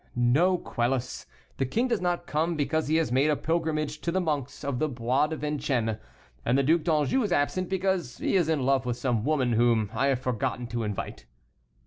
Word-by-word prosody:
"No, 140 +10 +3
Quelus, 125 -4 -2 0.3
the 135 - +1
king 235 - 0
does 240 - 0
not 175 -1 -1
come, 160 +3 0
because 155 +1 0
he 155 - +1
has 160 -5 +1
made 135 +4 +3
a 150 - +3
pilgrimage 155 -2 -1
to 170 - -1
the 190 - +1
monks 150 -7 -3
of 140 -3 -2
the 155 - +1
Bois 125 +3 +1
de 160 - -4
Vincennes; 135 -7 -1 0.5
and 125 +3 +2
the 140 - +3
Duc 160 +4 +3
d'Anjou 155 - +1
is 210 -5 -1
absent, 175 +3 0
because 190 -7 -1
he - - 0
is 175 -4 +3
in 155 -4 +1
love 135 -1 +2
with 120 -1 -1
some 120 -5 0
woman 135 -3 +1
whom 115 -3 +2
I 135 - +1
have 135 -2 +1
forgotten 125 -1 -2
to 120 0 -2
invite." 105 - -5
145 Hz, 205 wpm, -27 LUFS, 125-165 Hz, 0.5 s, No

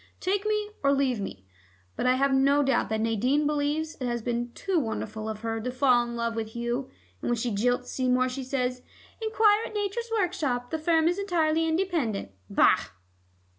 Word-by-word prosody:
Take 400 +2 0
me 425 -1 0
or 280 - +3
leave 270 -4 +1
me.' 95 - -6 0.5
But - - -1
I 255 - +4
have 275 +1 +2
no 280 +2 +4
doubt 270 -2 +1
that 220 0 -1
Nadine 250 +7 +1
believes 300 +2 -1
it 255 - -1
has 240 -2 -2
been 240 0 -2
too 380 -3 0
wonderful 220 -3 -4
of 215 -1 -5
her 225 -1 -2
to 250 - -3
fall 255 -1 +4
in 235 0 -5
love 235 -1 -2
with 220 -1 -4
Hugh. 240 +3 -2 0.3
And - - -2
when 240 - +2
she 235 +1 -1
jilts 245 +4 0
Seymour, 255 0 +2
she 260 +1 -4
says 250 -1 -2 0.4
'Enquire 440 -1 +3
at 435 - -11
Nature's 420 +3 -2
Workshop; 330 - -1
this 315 -1 -3
firm 325 -1 +3
is 350 +3 +1
entirely 325 -4 +1
independent.' 320 - -1 0.2
Bah!" - - +5
265 Hz, 190 wpm, -27 LUFS, 240-325 Hz, 0.5 s, Bah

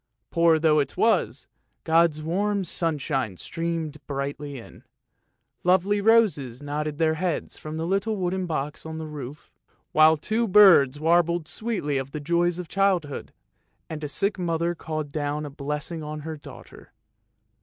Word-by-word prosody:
Poor 165 -1 +4
though 155 -1 +3
it 140 - -2
was, - - +1 0.4
God's 160 -1 +3
warm 200 +5 0
sunshine 145 - -2
streamed 165 - -4
brightly 140 0 -4
in; 115 - -13 0.8
lovely 190 +3 +3
roses 200 - +3
nodded 145 +1 -3
their 160 -1 +2
heads 170 +1 -2
from 155 +1 -7
the 160 - -2
little 200 +4 0
wooden 185 -1 -2
box 150 -2 -3
on 160 0 -6
the 160 - -5
roof, 145 -2 -9 0.4
while 155 +1 +6
two 220 +9 -1
blue 185 - -8
birds 160 -10 +7
warbled 170 0 +2
sweetly 190 -12 -2
of 135 +1 -7
the 150 - -3
joys 170 +3 +1
of 180 -2 -6
childhood, 185 -7 0 0.6
and 155 -1 -5
the 150 - -3
sick 200 +6 -1
mother 170 -1 0
called 155 -3 -5
down 150 0 -2
a 145 - -7
blessing 150 +3 -4
on 150 0 -6
her 160 +1 -5
daughter. 145 - -13
160 Hz, 155 wpm, -25 LUFS, 150-175 Hz, 0.8 s, birds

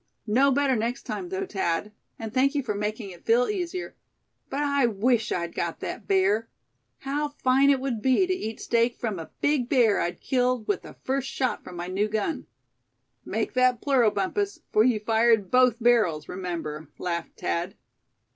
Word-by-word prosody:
"Know 250 +6 +4
better 275 -1 +2
next 235 +4 -2
time, 360 - -5
though, 385 +1 -2
Thad; 190 - -2 0.3
and 225 -1 -6
thank 275 +2 +2
you 285 - 0
for 220 -4 -2
making 210 0 -3
it 175 - -14
feel 235 +2 +3
easier. 365 -3 -4 0.5
But 280 - -2
I 280 -3 +2
wish 225 +1 +1
I'd 170 -1 -2
got 170 -1 -3
that 220 - -6
bear. 200 +4 +2 0.5
How 290 +2 -1 0.2
fine 265 +2 +5
it 275 -2 +4
would 255 -5 -3
be 260 - +3
to 370 - 0
eat 225 -12 -5
steak 235 0 +1
from 215 -6 -3
a 160 - -8
big 285 -4 +1
bear 235 -7 +4
I'd 175 - -2
killed 250 -3 0
with 205 - 0
the - - -12
first 265 0 -1
shot 255 -2 -1
from 180 - -10
my 175 0 -4
new 190 +4 0
gun." 215 +9 -2 0.8
"Make - - -2
that 255 -1 +3
plural, 255 -5 +3
Bumpus, 380 - -2
for 215 - +5
you 235 -3 +3
fired 220 -2 +2
both 250 -2 +5
barrels, 225 -10 +2
remember," 170 -4 -5
laughed 170 -2 -4
Thad. 175 +4 -2
235 Hz, 180 wpm, -26 LUFS, 205-270 Hz, 0.8 s, fine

